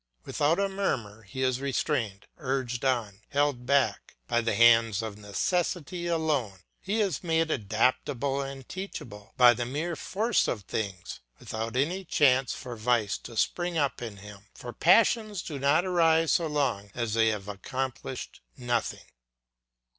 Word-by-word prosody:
Without 150 +4 +1
a 200 0 +1
murmur 125 - -2
he 115 +6 -5
is 130 0 +1
restrained, 130 -7 -1
urged 130 -4 -2
on, 115 -6 0
held 140 -4 0
back, 140 -1 +1
by 120 - +2
the 115 -2 0
hands 115 -1 +5
of 110 -2 -5
necessity 170 - -2
alone; 150 - 0 0.2
he 205 +4 -2
is 195 -9 0
made 165 -1 +1
adaptable 130 +5 0
and 135 -1 -7
teachable 135 - -8
by 125 -1 +8
the 120 +1 -3
mere 150 +8 -3
force 215 +9 0
of 105 -4 -2
things, 95 -3 -4 0.2
without 110 +2 -5
any 170 +9 0
chance 135 -6 +3
for 125 -2 -6
vice 110 -2 +1
to 115 - -10
spring 175 +7 0
up 140 -4 0
in 110 -4 -6
him; 105 +1 -12
for 120 -1 -8
passions 210 +1 +3
do 145 -4 -6
not 145 +6 +3
arise 165 -3 +3
so 170 - +2
long 135 -9 -1
as 115 -3 -2
they 115 0 +3
have 105 -3 -1
accomplished 130 +5 -5 0.2
nothing. 120 -3 -2
130 Hz, 150 wpm, -28 LUFS, 115-160 Hz, 0.2 s, by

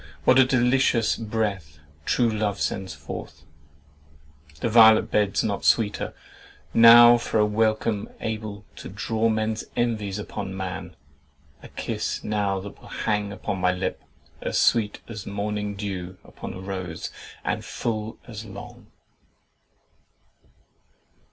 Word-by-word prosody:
What 130 +1 +5
a 130 - +7
delicious 125 -2 +2
breath 105 -9 -3 0.3
true 120 - +2
love 105 -2 -1
sends 95 -1 -2
forth! 70 +2 -8 1.2
The - - -1
violet 110 -1 +6
beds 105 -2 +2
not 100 -2 -2
sweeter. 105 -3 +1 0.6
Now 120 +1 +9
for 115 - -2
a 105 - +4
welcome 110 0 0
Able 110 -2 -5
to - - -8
draw 115 0 0
men's 110 0 -1
envies 110 -5 -1
upon 100 -2 -5
man: 95 -2 -5 0.7
A - - -11
kiss - - -4
now 100 -2 0
that 100 +1 -10
will - - -14
hang 105 -2 -1
upon 100 -1 -4
my 90 0 +3
lip, 90 +1 -3 0.4
As - - -2
sweet 105 -3 +2
as 110 -4 -8
morning 105 0 -3
dew 95 -3 -5
upon - - -9
a - - -8
rose, 95 -4 -5 0.3
And - - -1
full 110 -1 -4
as 110 -3 -7
long!" 100 -2 -11
105 Hz, 125 wpm, -25 LUFS, 100-115 Hz, 1.2 s, Now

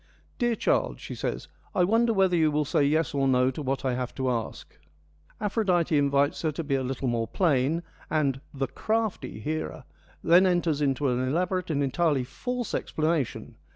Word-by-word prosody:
' - - -35
Dear 240 -2 +2
child,' - - 0
she - - -7
says, - - -4
' - - -32
I 180 - +4
wonder 225 +5 +3
whether 190 -4 +3
you 160 -2 +3
will 150 0 0
say 150 0 +2
yes 155 +2 +1
or 135 -1 +1
no 130 0 +3
to 140 - -6
what 135 -1 -2
I 130 - +1
have 125 0 -4
to 130 -1 0
ask.' 115 -2 -5 0.6
Aphrodite 190 -6 +1
invites 140 0 +2
her 160 - 0
to 165 - -4
be 145 -2 -2
a 135 - +2
little 130 +1 -3
more 115 -2 0
plain, 155 - +1 0.3
and 140 -4 0
' - - -35
the - - +3
crafty 220 +6 -2
' - - -10
Hera 80 - -3 0.4
then 180 +3 +6
enters 170 -5 +1
into 140 0 +1
an 125 0 0
elaborate 175 +8 -1
and 145 -3 +1
entirely 145 -1 +1
false 245 - -4
explana 155 -1 0
tion. - - -11
150 Hz, 200 wpm, -27 LUFS, 135-175 Hz, 0.6 s, then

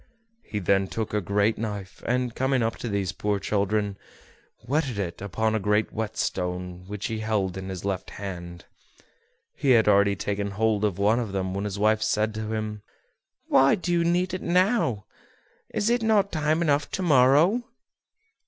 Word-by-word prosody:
He 105 - -6
then 95 0 +2
took 110 +2 -4
a 105 - +1
great 100 +4 +1
knife, 105 -4 -5
and, 125 -1 0
coming 130 -1 +1
up 115 0 -1
to 120 - -5
these 100 -3 -1
poor 105 +3 -1
children, 100 0 -1 0.7
whetted 140 -4 -1
it 90 -4 -4
upon 110 +3 -1
a 110 - +1
great 105 +2 +1
whet 110 0 -4
stone 90 -1 -3
which 105 0 -5
he 110 -1 -2
held 105 -4 -1
in 95 0 -6
his 95 -1 -6
left 95 -2 -2
hand. 85 -3 -7 0.9
He 140 - -1
had 115 -4 +5
already 100 -1 +4
taken 100 +1 -2
hold 105 +1 0
of 105 -4 0
one 105 +4 +3
of 110 -5 -4
them 95 -1 -2
when 100 +2 -3
his 100 -1 -4
wife 110 +1 +2
said 110 0 +1
to 110 0 -4
him: 110 -1 -3 0.6
"Why 135 +1 +5
need 180 - -7
you 170 -1 +2
do 180 +2 +1
it - - -15
now? 180 - +1 0.7
Is 205 - -1
it 240 0 +2
not 210 -3 +2
time 155 +1 +1
enough 145 -2 +1
to 190 - -1
morrow?" 150 - +5
105 Hz, 180 wpm, -26 LUFS, 100-130 Hz, 0.9 s, had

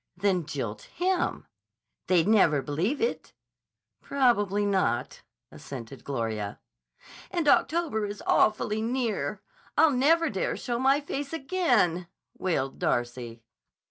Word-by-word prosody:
"Then 180 -4 +1
jilt 130 -8 -4 0.2
him." 365 +1 0 0.6
"They'd 180 -1 +3
never 165 -10 +4
believe 175 - -1
it." 465 - -2 0.7
"Probably 205 -7 +2
not," 190 -11 0 0.3
assented 130 -1 -9
Gloria. 110 -6 -3 0.7
"And 340 -4 -1
October 290 -9 +2
is 205 0 -7
awfully 215 0 +2
near! 235 -1 -2 0.3
I'll 320 -2 +6
never 315 +5 +3
dare 195 - -1
show 240 -1 -3
my 270 +3 +3
face 285 +1 -5
again," 245 - +1 0.3
wailed 140 -8 -2
Darcy. 120 -1 -2
205 Hz, 110 wpm, -27 LUFS, -, 0.7 s, I'll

